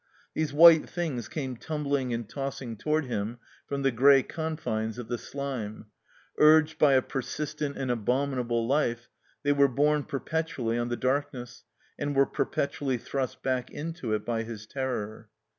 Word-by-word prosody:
These 155 -2 -1
white 160 +1 +8
things 150 - -3
came 130 -2 -4
tumbling 140 -3 -1
anditossing 120 0 -4
toward 155 +2 +1
him 115 -1 -3 0.3
from 140 -1 -2
the 135 - +3
gray 135 +3 +6
confines 125 -9 -3
of 120 -2 -7
the 120 - -2
slime; 115 -7 -5 0.5
urged 155 0 +6
by 145 -2 +6
a 130 -1 +4
per 135 - -3
sistent 150 +1 -4
and 130 -2 -1
abominable 120 0 0
life, 120 -4 0 0.3
they 145 - +3
were 140 -1 +5
borne 145 +3 +2
per 140 -2 -4
petually 130 -9 -1
on 120 - -2
the 120 - -2
darkness 130 -1 -2 0.3
and 145 0 -2
were 140 0 +5
perpetually 140 -2 -1
thrust 130 +1 -4
back 130 -2 -1
into 155 -6 -4
it 105 - -4
by 115 -1 -1
his 110 -1 -7
terror. 115 -4 -4
135 Hz, 160 wpm, -28 LUFS, 120-145 Hz, 0.5 s, white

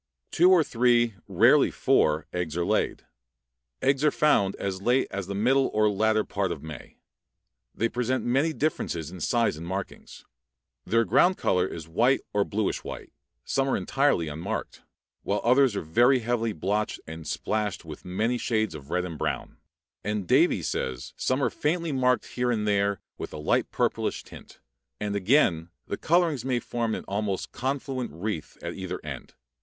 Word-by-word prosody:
Two 175 +3 +5
or 180 -3 +6
three, 120 -2 +2
rarely 115 +10 +5
four, 80 - +2
eggs 85 -3 -3
are 85 - 0
laid. - - 0 0.8
Eggs 135 +1 +2
are 150 - +6
found 120 -11 +2
as 95 -1 -4
late 125 +5 +2
as 100 -2 -4
the 100 - -4
middle 130 +6 +3
or 105 0 +4
latter 110 +1 +2
part 100 -3 -2
of - - -6
May. 80 -3 -10 0.8
They 115 - +1
present 125 +2 -1
many 135 +7 +2
differences 85 - -2
in 90 - -9
size 115 -2 +1
and 85 +2 -7
markings; 95 +2 -6 0.6
their 115 +4 +2
ground 175 - +4
color 90 0 +1
is 80 -3 -8
white 120 +11 +2
or 105 -1 +3
bluish 105 0 -2
white, - - -8 0.3
some 135 0 0
are - - +2
entirely 135 - +1
unmarked, 75 +2 -5 0.4
while 100 +1 -1
others 125 -1 +4
are - - -2
very 120 - +4
heavily 115 -1 0
blotched 100 +5 -1
and 80 0 -8
splashed 105 -5 -2
with 75 -2 -9
many 110 +7 -1
shades 110 -6 0
of 70 -2 -10
red 90 +1 0
and 80 -4 -7
brown; - - -3 0.5
and 105 -3 -2
Davie - - +3
says 65 -1 -3
some 130 +2 0
are 120 - +1
faintly 165 +2 -1
marked 125 -2 +2
here 125 0 -2
and 110 -3 0
there 100 -1 +1 0.2
with - - -6
a - - -5
light 75 - +1
purplish - - -1
tint, - - -14 0.4
and 105 -1 -2
again 95 - +2 0.2
the - - -3
colorings 165 - +1
may 130 -2 0
form 115 -1 -2
an - - -7
almost 100 -1 -2
confluent 130 -1 -3
wreath 85 +1 -5
at - - -4
either - - -5
end. - - -8
110 Hz, 170 wpm, -27 LUFS, 95-130 Hz, 0.8 s, or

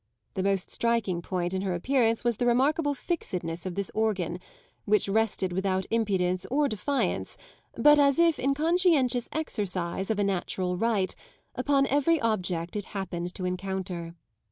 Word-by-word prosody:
The 190 - -2
most 195 -1 0
striking 230 -7 0
point 175 0 -2
in 190 - -1
her 190 -2 -1
appearance 230 +3 +1
was 240 -3 +1
the 245 - 0
remarkable 285 +4 +2
fixedness 180 - -3
of 180 - -5
this 200 -2 -2
organ, 200 -5 -1 0.5
which 210 0 +3
rested 200 -3 0
without 190 0 0
impudence 190 -5 +1
or 290 +2 +2
defiance, 275 +5 -2 0.4
but 295 0 +6
as 280 0 +4
if 335 -3 +4
in 275 +2 +1
conscientious 310 -6 +2
exercise 195 - -2
of 220 - +1
a 205 - +2
natural 185 -1 -1
right, 205 -1 0 0.4
upon 275 -1 +2
every 290 +4 +2
object 180 -7 -1
it 205 -2 -3
happened 175 -2 -4
to 185 - -4
encounter. 180 -2 -4
205 Hz, 155 wpm, -28 LUFS, 185-265 Hz, 0.5 s, but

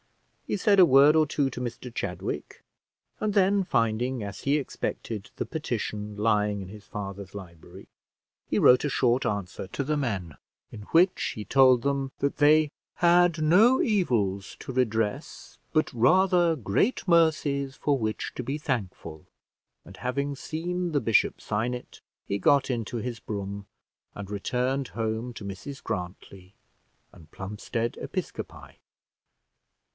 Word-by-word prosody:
He - - -1
said 200 +1 +3
a 185 - +9
word 140 +1 +6
or 155 -1 +5
two 140 -1 0
to 125 - -6
Mr 120 0 -6
Chadwick, - - -5 0.6
and 215 -1 0
then 195 0 +4
finding, 120 -3 0
as 100 0 -6
he 140 +2 +2
expected, 115 -6 -4
the - - -2
petition 105 -8 -4
lying 105 -1 +1
in 95 -1 -7
his 105 0 -11
father's 100 -2 -7
library, 85 -5 -11 0.6
he - - -1
wrote 125 - +6
a 145 - 0
short 125 -1 +1
answer 100 -2 -3
to 140 - -3
the 150 +3 -1
men, 100 - -3 0.4
in 105 - -9
which 180 +3 +3
he 105 - -6
told 130 -3 +5
them 140 -1 -1
that 140 - -1
they 150 +1 +5 0.3
had 175 -2 +4
no 205 +12 +5
evils 115 - 0
to 130 - -6
redress, 115 +2 -2
but 155 -1 +1
rather 175 +6 +4
great 130 - 0
mercies 150 -5 +2
for 145 -2 0
which 110 -3 -3
to - - -4
be 140 +2 -3
thankful; 95 - -4 0.6
and 95 +3 -13
having 140 +4 -2
seen 175 +5 -3
the 145 - +3
bishop 115 -3 +2
sign 115 +4 -2
it, 125 - -9 0.3
he 100 - -1
got 140 +4 +3
into 120 -2 -2
his 120 0 -4
brougham 100 -2 -6 0.5
and 100 -1 -7
returned 125 +6 -1
home 110 +2 -3
to 110 -3 -9
Mrs 100 +8 -7
Grantly, 90 +1 -7 0.6
and 80 -2 -17
Plumstead 105 +4 -4
Episcopi. - - -6
125 Hz, 145 wpm, -27 LUFS, 105-150 Hz, 0.6 s, a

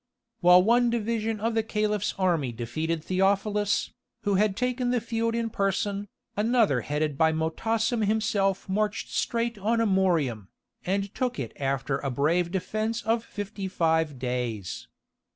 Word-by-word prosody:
While 180 -1 +7
one 240 +3 +4
division 225 -1 -1
of 225 +2 0
the 225 - +2
Caliph's 210 -2 -1
army 170 -9 +1
defeated 155 +8 -3
Theophilus, 200 +3 +1 0.3
who 205 -1 +1
had 200 0 +2
taken 250 0 0
the 245 0 +2
field 230 0 -1
in 230 -1 -1
person, 200 +1 -1 0.3
another 215 - +2
headed 150 0 -2
by 160 0 +5
Motassem 220 +9 0
himself 200 -3 +1
marched 210 +2 -1
straight 235 -2 -1
on 220 +4 +1
Amorium, 175 - +1 0.4
and 195 +2 -1
took 250 -2 -1
it 130 -6 -4
after 135 0 -1
a 140 - -2
brave 160 +7 +1
defence 215 +5 -2
of 225 +1 +1
fifty 205 -2 -5
five 160 -5 +1
days. 125 -6 -3
200 Hz, 140 wpm, -27 LUFS, 160-225 Hz, 0.4 s, While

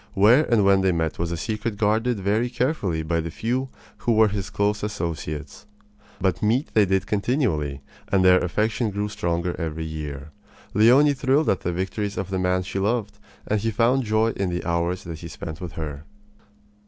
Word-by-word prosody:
Where 115 +9 +5
and 110 -4 +4
when 100 -1 +5
they 95 -1 +3
met 80 -2 -1
was 85 0 -1
a 85 - -2
secret 110 +3 -3
guarded 110 +2 +1
very 105 +5 +1
carefully 115 - -1
by 85 +1 0
the 85 0 -3
few 125 +9 -2 0.3
who 120 - 0
were 110 -1 +5
his 100 -1 -4
close 105 +1 0
associates. 85 -3 -5 0.5
But 95 -1 0
meet 120 +7 +1
they 105 -3 +4
did 95 0 +1
continually, 100 - -1 0.3
and 95 -2 +3
their 90 0 +7
affection 110 +5 0
grew 105 +1 -2
stronger 85 -3 -2
every 80 0 -3
year. 75 -2 -6 0.4
Leonie 130 +8 +6
thrilled 140 +3 +2
at 95 - 0
the 90 - -1
victories 95 +3 -3
of 95 0 -4
the 95 - -1
man 90 0 +1
she 95 +1 -4
loved; 105 +1 -1 0.3
and 105 -1 0
he 115 - 0
found 120 +5 +2
joy 110 0 +2
in 100 -4 -2
the 85 0 -3
hours 85 +2 -1
that 85 -2 -7
he 85 - -8
spent 80 +1 -7
with 85 -2 -6
her. 75 -2 -6
100 Hz, 190 wpm, -24 LUFS, 85-110 Hz, 0.5 s, their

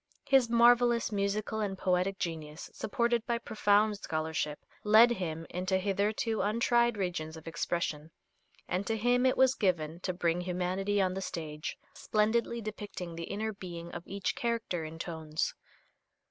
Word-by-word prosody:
His 265 -4 +5
marvelous 235 0 +5
musical 205 +1 -1
and 200 -3 -2
poetic 185 +1 +1
genius, 160 -3 -5
supported 235 0 0
by 235 - +1
profound 210 -2 +2
scholarship, 155 -3 -3 0.2
led 220 +3 +7
him 165 -7 -3
into 185 +1 0
hitherto 205 +3 0
untried 235 +2 +2
regions 170 -4 -3
of 160 - -12
expression, 165 -2 -2 0.6
and 185 +2 -2
to 225 - 0
him 245 +3 +3
it 255 - +2
was 260 -1 +5
given 170 -7 0
to 185 - -2
bring 175 -1 0
humanity 185 +3 -1
on 185 -1 +2
the 190 - -4
stage, 155 -4 -5 0.2
splendidly 230 +2 0
depicting 205 -5 -6
the 165 0 -5
inner 215 +4 -3
being 170 -3 -8
of 175 - -6
each 200 0 -2
character 230 -8 -2
in 160 +1 -7
tones. 160 -2 -3
195 Hz, 145 wpm, -31 LUFS, 170-220 Hz, 0.6 s, led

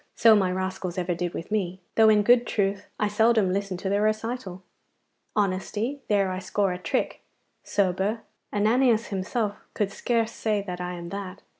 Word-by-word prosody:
So 225 -1 +7
my 190 -3 +2
rascals 185 -1 -3
ever 180 0 0
did 175 0 -3
with 165 - -6
me, 190 -4 -1
though 220 -1 +6
in 210 -1 +5
good 240 +2 +5
truth 200 -1 -1
I 210 - +2
seldom 215 -2 +3
listened 195 -2 -2
to - - -3
their 200 +1 +1
recital. 215 -3 -2 0.7
Honesty 210 +7 -1
there 200 -3 +2
I 185 - -3
score 195 0 0
a 180 - -6
trick. - - -2 0.4
Sober 200 +3 0 0.3
Ananias 225 +2 +3
himself 205 +2 -2 0.2
could 205 -2 0
scarce 230 +2 0
say 215 -3 -1
that 180 -2 -5
I 180 0 -3
am 170 0 -7
that. 195 0 -6
200 Hz, 170 wpm, -26 LUFS, 185-220 Hz, 0.7 s, So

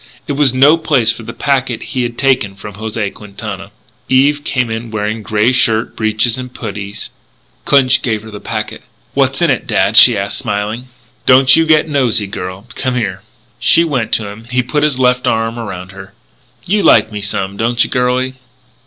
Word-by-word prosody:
It - - -4
was 140 -2 +3
no 140 +5 +5
place 135 -8 +2
for 115 - -7
the 115 - -7
packet 130 -1 -1
he 130 - 0
had 120 -1 -3
taken 130 -8 +1
from 105 +1 -9
José 110 0 -4
Quintana. 100 -1 -8 0.4
Eve 145 +3 +3
came 125 -5 -1
in 115 +1 -5
wearing 110 +1 -3
grey 110 +2 +1
shirt, 115 -3 +1
breeches, 110 +2 0
and 125 -1 -7
puttees. 100 -3 -7 0.5
Clinch 135 -2 +3
gave 110 -4 -2
her 110 - -11
the 105 - -8
packet. 110 0 -5 0.3
"What's - - +1
in - - +3
it, - - -2
dad?" - - +1
she 120 -4 +8
asked 100 +1 -2
smilingly. 110 +2 -3 0.4
"Don't 130 +1 +6
you 165 0 +2
get 155 0 +4
nosey, 125 -7 +1
girlie. 95 -1 -7
Come 130 -2 -2
here." 100 -6 -2 0.4
She 130 +7 +4
went 135 -9 -2
to 105 - +1
him. 105 +3 -10
He 125 +1 -1
put 150 +4 -1
his 150 -3 +2
left 125 -1 +1
arm 115 +1 -1
around 95 -4 -7
her. 95 0 -12 0.5
"You 205 +3 +1
like 110 - +4
me 105 -1 -5
some, 100 -1 -3
don't 120 +3 +1
you, - - -4
girlie?" 125 0 0
115 Hz, 190 wpm, -15 LUFS, 105-130 Hz, 0.5 s, she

